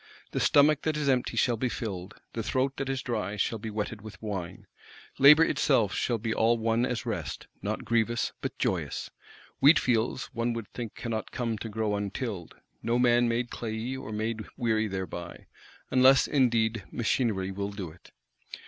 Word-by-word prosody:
The - - -1
stomach 145 +1 +5
that 155 -1 -1
is 150 -2 -1
empty 130 -2 +1
shall 120 -2 +2
be 125 +2 0
filled; 100 -4 -5 0.2
the 115 - -2
throat 130 +4 0
that 135 - -3
is 135 -1 -2
dry 110 -4 -2
shall 110 +3 0
be 110 +1 -5
wetted 105 0 -4
with 105 -3 -10
wine. 95 -4 -5 0.5
Labour 150 +4 +9
itself 120 - +2
shall 120 - 0
be 110 0 -2
all 115 +2 +3
one 115 +2 +1
as 125 -3 -3
rest; - - -4 0.2
not - - -3
grievous, 115 +1 +1
but - - -4
joyous. - - -2 0.5
Wheatfields, 130 -5 +3
one 115 0 0
would 115 -3 -6
think, 120 -3 -6
cannot 115 -2 -4
come 115 -2 -2
to 115 - -5
grow 110 -1 -1
untilled; 100 -2 -4 0.3
no 115 +1 +1
man 120 -1 +4
made 120 +1 -1
clayey, 115 +3 -4
or 130 -5 -7
made 110 +1 -2
weary 110 -2 +1
thereby;—unless 95 - 0
indeed 115 -5 +2
machinery 110 -5 0
will 100 +1 -3
do 100 -5 -6
it? 85 - -19
115 Hz, 165 wpm, -28 LUFS, 105-125 Hz, 0.5 s, Labour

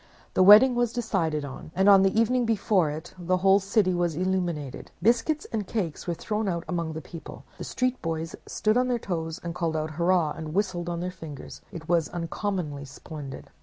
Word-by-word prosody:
The - - +3
wedding 210 +7 +9
was 240 -1 +1
decided 170 -11 -1
on, 140 +2 -9
and 190 +1 +3
on 200 -1 +8
the 195 +3 +3
evening 245 +2 +2
before 205 -6 +2
it 155 +3 -7
the 180 +1 +1
whole 195 +2 +5
city 195 -1 +2
was 175 -2 0
illuminated. 175 -6 -2
Biscuits 240 - +2
and 215 -4 -2
cakes 180 -9 -3
were 170 - -1
thrown 215 +4 -2 0.2
among 170 -2 -2
the 160 - -6
people, 165 -2 -10 0.2
the - - -4
street 255 0 -1
boys 165 -1 -3
stood 215 +2 +1
on 250 0 +2
their 250 -1 +1
toes, 165 -6 -4
called 165 -2 -1
out 155 0 -2
"Hurrah!" 170 0 +2
and 155 +1 -6
whistled 185 -4 -1
on 170 0 -3
their 180 +1 -3
fingers. 160 -6 -9
It 160 -2 -8
was 170 -3 +2
uncommonly 170 -4 -3
splendid. 140 0 -9
180 Hz, 190 wpm, -26 LUFS, 160-205 Hz, 0.2 s, wedding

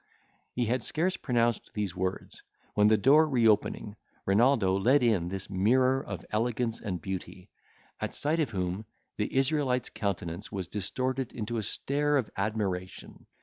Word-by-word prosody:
He 120 - +1
had 120 +1 0
scarce 180 +4 0
pronounced 120 -3 0
these 105 -4 -2
words, 95 +1 -3 0.3
when 105 0 +4
the 110 0 +5
door, 150 +8 +5
reopening, 110 -4 +2 0.3
Renaldo 100 -2 +3
led 125 +8 +3
in 105 -8 +2
this 95 +1 -5
mirror 130 +7 +2
of 95 -4 -7
elegance 115 +1 -1
and 90 -4 -3
beauty, 95 +1 -7 0.5
at - - -3
sight 155 +3 0
of 150 -6 +1
whom 95 +1 -3 0.3
the 105 - -1
Israelite's 135 -2 +1
countenance 90 -3 -3
was 95 -4 -4
distorted 130 +5 -2
into 115 0 -3
a - - 0
stare 145 +7 0
of 125 -6 -2
admiration. 100 -3 -3
110 Hz, 150 wpm, -29 LUFS, 95-130 Hz, 0.5 s, the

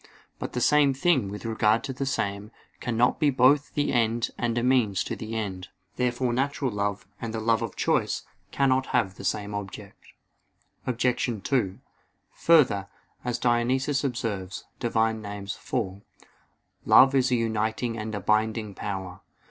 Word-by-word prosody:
But - - -5
the 125 - -2
same 145 +1 +4
thing, 135 - +2
with 105 +3 -7
regard 110 0 +2
to 135 - -4
the 135 +1 -3
same, 100 -5 -2 0.3
cannot 120 +1 +1
be 150 -2 +4
both 140 +2 +3
the 145 -2 +1
end 115 -1 +1
and 120 -1 -1
a 120 - +1
means 115 -7 +2
to - - -4
the 110 +1 -6
end. 95 -4 -4 0.3
Therefore 125 0 0
natural 135 +1 0
love 100 -1 -2 0.2
and 115 -1 -4
the - - -2
love 115 +1 +2
of 115 -4 -4
choice - - 0 0.3
cannot 130 -1 +2
have 100 -6 0
the 100 - -11
same 100 +2 -2
object. 100 -2 -7 0.8
Obj. 125 0 +1 0.2
2: 110 -9 0 0.5
Further, 130 -12 +3 0.4
as 125 -1 -1
Dionysius 125 +4 +1
observes 110 -8 -3
(Div. 120 -1 -3
Nom. 110 -1 +2
iv): 100 0 -4 0.8
"Love 135 +1 +7
is 130 -2 +3
a - - +4
uniting 115 +1 -1
and 110 -1 -4
a - - -2
binding 110 +1 0
power." 95 -2 -5
115 Hz, 155 wpm, -26 LUFS, 105-130 Hz, 0.8 s, Love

